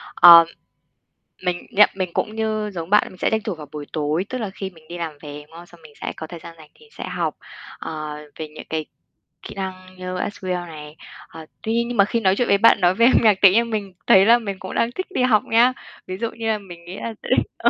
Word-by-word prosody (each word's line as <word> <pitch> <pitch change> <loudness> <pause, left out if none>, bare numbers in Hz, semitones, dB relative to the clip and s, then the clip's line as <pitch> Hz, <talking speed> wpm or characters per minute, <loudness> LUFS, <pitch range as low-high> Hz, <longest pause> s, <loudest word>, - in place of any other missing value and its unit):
Ờ, 170 -1 +10 1.0
mình 180 -1 -2
nhận 210 +1 +6
mình 185 -2 -2
cũng 215 - -2
như 215 -1 -1
giống 170 -1 -6
bạn 210 - +5
mình 185 - -15
sẽ - - 0
tranh 220 0 0
thủ 205 -3 -4
vào 150 -2 -10
buổi 150 -1 -7
tối, 155 +3 -1
tức 255 - -3
là 215 -5 -4
khi 195 0 -6
mình 160 -4 -20
đi 175 - -6
làm 165 -3 -4
về, 145 -1 -9
đúng - - -28
không? 170 +1 -11
Xong 175 -1 -19
mình 155 -2 -16
sẽ - - -4
có 160 - -7
thời 170 +1 -9
gian 165 0 -12
rảnh 155 -2 -16
thì 455 - -20
sẽ - - -8
học, - - -2 0.4
ờ, 155 -1 -6 0.2
về 160 - -4
những 155 0 -11
cái 155 -1 -2 0.6
kỹ - - -10
năng 190 -1 -3 0.2
như 185 0 -5
SQL 180 -3 -4
này. 150 -1 -10 0.3
Ờ, 160 -1 -11 0.2
tuy 220 - -1
nhiên 235 0 +1
nhưng 240 -1 -4
mà 200 - +6
khi 230 +3 -1
nói 190 -3 +2
chuyện 245 - 0
với 200 - +4
bạn 205 -1 +5
nói 180 +1 +4
về 230 - +4
âm 255 - +5
nhạc 215 -3 +5
tự 195 - +9
nhiên 230 +4 +2
mình 205 -4 -4
thấy 190 0 +7
là 235 +2 +6
mình 200 -4 -5
cũng 185 - -7
đang 230 - +1
thích 370 +9 -5
đi 380 - -2
học 220 -4 +3
nhá. 240 +3 +4 0.3
Ví 185 - -5
dụ 230 +2 -3
như 230 -1 -5
là 220 -1 +1
mình 175 -4 -13
nghĩ 180 +2 -8
là 230 - -5
sẽ - - -7 0.3
ờ, 235 - +3
190 Hz, 265 wpm, -21 LUFS, 165-220 Hz, 1.0 s, Ờ